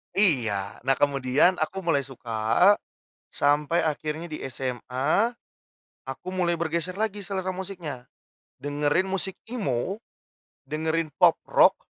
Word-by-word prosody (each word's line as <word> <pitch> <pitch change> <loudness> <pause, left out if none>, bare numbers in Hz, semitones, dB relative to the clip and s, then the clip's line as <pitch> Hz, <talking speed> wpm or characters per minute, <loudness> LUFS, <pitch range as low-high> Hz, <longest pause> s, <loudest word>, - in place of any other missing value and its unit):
Iya, 115 - +2
nah 135 - +4
kemudian 140 +5 +3
aku 190 +4 -2
mulai 145 -6 +1
suka, 125 - +3 0.5
sampai 150 +3 +2
akhirnya 155 +2 -2
di 155 -2 -7
SMA, 130 - 0 0.8
aku 135 +7 -6
mulai 180 -2 +1
bergeser 170 +1 -1
lagi 205 -2 -2
selera 190 -1 -2
musiknya, 175 -9 -6 0.6
dengerin 145 +6 +1
musik 190 0 -2
emo, 190 - -1 0.7
dengerin 160 +1 -1
pop - - +7
rock, - - +5
155 Hz, 110 wpm, -26 LUFS, 135-185 Hz, 0.8 s, pop